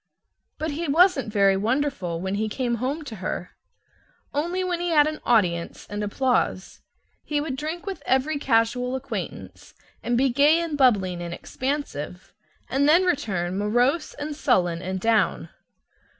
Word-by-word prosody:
But 315 0 -2
he 325 +3 -3
wasn't 305 - +3
very 200 -2 +4
wonderful 210 -6 -1
when 190 +2 -3
he 215 +2 -1
came 240 +1 -1
home 285 +5 -2
to 230 -7 -8
her 180 -1 -4 0.8
only 345 +6 -1
when 360 -2 -1
he 350 0 -1
had 300 -3 +5
an 310 0 -3
audience 180 -8 +1
and 205 0 -3
applause. 230 -3 -1 0.4
He 295 -1 -1
would 290 -3 -3
drink 315 +6 -5
with 390 -2 -5
every 280 +3 +1
casual 250 0 +1
acquaintance, 265 - -7 0.3
and 240 0 0
be 265 +2 +3
gay 290 +6 +4
and 335 -3 -2
bubbling 200 -10 +2
and 170 0 -5
expansive; 255 - -4 0.3
and 280 +2 +2
then 340 +4 +6
return 200 - -1
morose 245 +9 +1
and 295 +1 -5
sullen 180 - +1
and 185 +1 -3
down. 225 +2 +1
255 Hz, 150 wpm, -24 LUFS, 200-295 Hz, 0.8 s, then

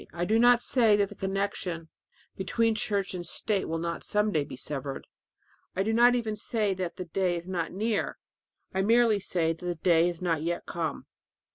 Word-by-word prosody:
I 175 +3 -2
do 220 +4 +2
not 245 0 +5
say 230 -5 +4
that 200 -1 +1
the - - -9
connection 190 -4 -3 0.5
between 225 +4 +1
church 205 -3 -1
and 180 -1 -4
state 195 +4 -1
will 165 - -1
not 170 +1 -3
some 210 0 +1
day 155 -6 +1
be - - -9
severed; 135 0 -5 0.7
I 190 - +1
do 220 +2 0
not 240 +2 +6
even 225 -3 -1
say 210 -1 0
that 185 -2 -4
that 180 -3 -8
day 185 -2 +1
is 170 +1 -8
not 175 -3 -2
near. 215 +2 -1 0.6
I 190 - +1
merely 225 0 +4
say 165 -4 0
that 165 - -15
the 175 -1 -2
day 165 0 +3
has 175 -2 -3
not 165 -4 0
yet 170 +2 -2
come." 165 -2 -3
190 Hz, 200 wpm, -28 LUFS, 170-215 Hz, 0.7 s, not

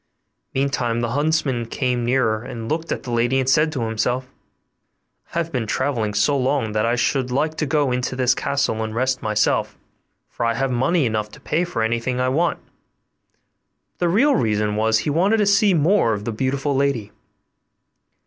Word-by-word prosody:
Meantime 130 -4 0
the 115 - -1
huntsman 145 -4 0
came 125 -1 -1
nearer 115 -3 +1
and 120 -3 -7
looked 160 +4 -3
at - - -3
the 125 - -6
lady, 120 +3 +1
and 130 - -1
said 150 +4 +3
to 130 -6 -3
himself, 115 +3 -1
'I 135 +4 -18
have 165 -1 -1
been 120 -5 -2
travelling 115 -4 -1
so 110 +8 +2
long 130 -4 0
that 110 +1 0
I 120 - +2
should 125 +2 0
like 155 +5 0
to 155 - -1
go 145 -2 +1
into 125 +1 -2
this 125 -1 +3
castle 135 -5 -1
and 110 0 -4
rest 130 +1 0
myself, 105 -1 0 0.5
for - - -5
I 115 0 +1
have 135 +2 -1
money 135 +6 +1
enough 110 -2 -1
to - - -12
pay 165 +3 -1
for 145 -10 -2
anything 120 +2 -1
I 130 0 +1
want'; 165 +6 +1
but - - -45
the 175 - +1
real 265 +11 +3
reason 105 - 0
was, 110 +1 +2
that - - -2
he 150 - -1
wanted 190 +9 +2
to 210 - +2
see 200 -1 +4
more 160 - +3
of 105 0 -5
the 115 - -2
beautiful 135 +5 -1
lady. 135 -7 0
130 Hz, 190 wpm, -21 LUFS, 115-145 Hz, 0.5 s, see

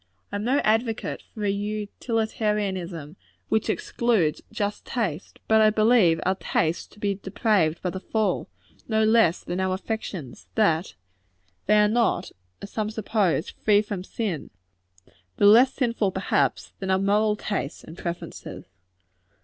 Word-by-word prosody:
I - - -2
am 205 - -4
no 255 +5 +2
advocate 225 +1 0
for 210 -2 -3
a 200 - +2
utilitarianism 205 - -2 0.3
which 220 -1 +1
excludes 210 -11 +1
just 205 0 -3
taste: 195 - -3
but 220 0 +5
I 215 - +6
believe 215 -6 +4
our 190 - +3
tastes 165 -3 -1
to - - -20
be 205 -1 0
depraved 190 -4 0
by 180 - -1
the 190 - -5
fall, 220 +2 -1 0.4
no 220 -1 +2
less 220 -6 +4
than 175 +2 -3
our 190 0 +1
affections; 190 - -6
that 175 -5 +2 0.7
they 210 +1 +5
are 210 0 +5
not, 230 +2 +1 0.3
as 200 - -8
some 215 -1 -2
suppose, 210 -6 0
free 210 -1 +3
from 205 -4 -5
sin 195 -6 -4 0.9
though - - +3
less 235 +6 +7
sinful, 230 -7 0
perhaps, 190 - 0
than 190 - -4
our 190 - +4
moral 210 +2 +2
tastes 200 -8 -4
and 160 - -11
preferences. 170 0 -6
205 Hz, 145 wpm, -25 LUFS, 185-220 Hz, 0.9 s, less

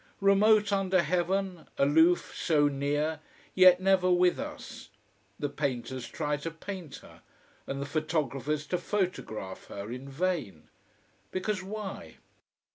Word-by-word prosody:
Remote 205 +1 +4
under 190 -2 +2
heaven, 180 +2 -1
aloof, 160 +5 +3
so 150 -3 +3
near, 145 +2 -1 0.3
yet 185 -1 +7
never 185 -1 +3
with 180 0 +3
us. - - -8 0.5
The 145 - -1
painters 130 -3 -3
try 150 -2 -2
to 150 +3 -4
paint 165 -1 -8
her, - - -16 0.5
and 135 - -3
the 140 - -3
photographers 150 -1 -1
to 180 - -1
photograph 175 - -3
her, 100 +2 -7
in 130 +2 -7
vain. 145 - -3 0.6
Because 190 +1 -2
why? 200 0 -7
165 Hz, 120 wpm, -29 LUFS, 145-185 Hz, 0.6 s, yet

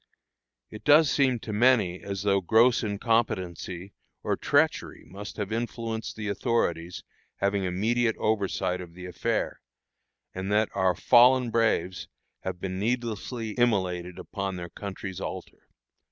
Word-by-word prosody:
It 110 - -10
does 150 0 +6
seem 135 -4 +3
to 110 - -5
many 105 -6 +3
as 100 -1 -4
though 100 -1 +2
gross 115 +6 +4
incompetency 100 -4 -1 0.3
or - - 0
treachery - - +1
must 100 +2 -9
have 105 -2 -3
influenced 115 -1 -3
the 110 -1 -5
authorities 90 -5 -1 0.3
having 100 -1 0
immediate 110 +6 +1
oversight 100 -4 0
of 85 -2 -11
the 90 0 -9
affair, 90 -1 -2 0.7
and 95 +2 -4
that 105 +1 +3
our 95 -2 +2
fallen 125 0 +5
braves 95 -6 0 0.3
have 95 -1 -5
been 95 0 -4
needlessly 115 0 -2
immolated 95 -7 0
upon 95 -1 -4
their 90 -1 -6
country's 95 0 -7
altar. - - -7
100 Hz, 130 wpm, -27 LUFS, 95-115 Hz, 0.7 s, does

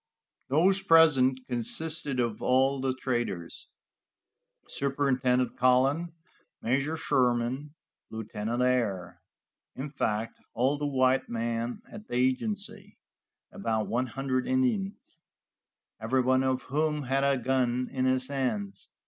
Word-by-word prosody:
Those 185 +8 +3
present 135 -7 +5
consisted 135 +3 -1
of 115 -3 -1
all 135 +1 +2
the 130 -1 -1
traders, 120 -10 -3 1.0
Superintendent 130 -2 0
Cullen, 135 +7 +2 0.5
Major 140 +7 0
Sherman, 125 +3 0 0.3
Lieutenant 110 +2 -3
Ayer, 105 -9 -1 0.5
in 140 +2 -5
fact, 110 -5 -2 0.2
all 135 +4 +1
the 145 - -1
white 130 -1 +2
men 115 +1 -3
at 210 +1 -10
the - - -5
agency, 200 - -1 0.5
and 200 - -10
about 110 - 0
one 125 +2 -1
hundred 130 +1 -2
Indians, 215 -9 -1 0.8
everyone 130 +3 +2
of 130 -1 0
whom 150 +2 -1
had 135 +1 0
a 140 -1 +3
gun 125 0 0
in 130 -1 -1
his 130 0 +2
hands. 110 -8 -3
130 Hz, 115 wpm, -28 LUFS, 120-145 Hz, 1.0 s, present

